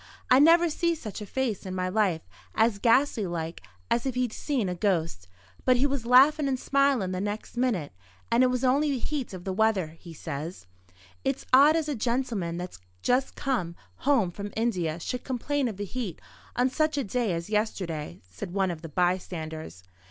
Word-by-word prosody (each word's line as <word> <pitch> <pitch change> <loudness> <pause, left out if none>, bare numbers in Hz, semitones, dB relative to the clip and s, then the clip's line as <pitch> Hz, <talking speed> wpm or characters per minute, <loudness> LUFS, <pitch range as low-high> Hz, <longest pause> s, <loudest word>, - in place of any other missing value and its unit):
I 255 - +8
never 335 +3 +6
see 335 +1 0
such 220 -8 -7
a 210 - -6
face 245 -3 -2
in 185 -1 -5
my 185 0 -1
life, 185 -4 +1 0.3
as 220 -2 +3
ghastly 235 -2 +3
like 165 - -4 0.3
as 235 - +2
if 260 - -2
he'd 250 -3 0
seen 265 -9 -1
a 180 - -1
ghost. 165 - -1 0.4
But 255 -1 +4
he 260 - +3
was 275 -4 -1
laughin' 275 +4 +6
and 260 -2 0
smilin' 275 -10 +2
the 185 0 -2
next 205 +3 -4
minute; 235 - 0 0.4
and 235 +2 +4
it 255 - +6
was 250 0 -1
only 280 +4 +3
the 275 - 0
heat 275 +1 -3
of 185 -2 -8
the 190 - -3
weather, 200 -5 +2
he 170 - -11
says." 160 - -6 0.6
"It's 270 0 -1
odd 285 +4 +8
as 320 -2 0
a 300 - -1
gentleman 235 -8 -1
that's 180 - -6 0.2
just 255 +2 +1
come 185 -12 -1 0.2
home 250 -10 +2
from 200 +3 -6
India 180 -8 0
should 250 +8 -4
complain 270 +2 -1
of 215 -5 -5
the 205 - -3
heat 210 -5 -5 0.4
on 250 +1 +2
such 310 +1 +1
a 280 - +1
day 230 -1 -1
as 170 +4 -4
yesterday," 185 -8 -2
said 95 - -8
one 190 -2 +2
of 160 -2 -7
the 165 - -8
bystanders. 160 - -2
220 Hz, 195 wpm, -27 LUFS, 180-260 Hz, 0.6 s, I